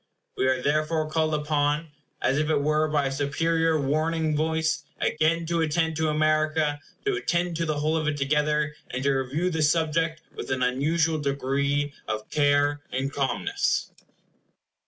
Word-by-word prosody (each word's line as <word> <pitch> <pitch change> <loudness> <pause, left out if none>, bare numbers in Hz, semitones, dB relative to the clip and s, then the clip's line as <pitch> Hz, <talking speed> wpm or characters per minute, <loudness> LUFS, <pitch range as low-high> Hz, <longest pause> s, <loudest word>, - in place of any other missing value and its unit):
We 130 - +1
are 130 0 +2
therefore 155 +2 +1
called 155 -1 +1
upon, 150 +1 0 0.3
as 135 +3 +2
it 150 - 0
were 155 +1 +2
by 150 -2 +1
a 135 - -1
superior 160 +3 +1
warning 155 +2 0
voice, 160 +1 0 0.2
again 165 +2 +1
to 170 0 0
attend 160 +1 +1
to 160 -1 +1
America; 155 -1 +1 0.3
to 410 - +2
attend 175 - -1
to 165 0 -1
the 155 -1 -1
whole 155 +2 0
of 155 -1 0
it 150 -1 0
together; 150 +1 +1 0.2
and 130 +1 -4
to 140 - +3
review 135 +7 -1
the 160 -2 -1
subject 160 +1 +1
with - - -7
an 130 -1 0
unusual 155 +5 +1
degree 140 +1 0
of 110 0 -3
care 145 0 +2
and 135 +2 -2
calmness. 400 - -1
155 Hz, 155 wpm, -26 LUFS, 145-160 Hz, 0.3 s, to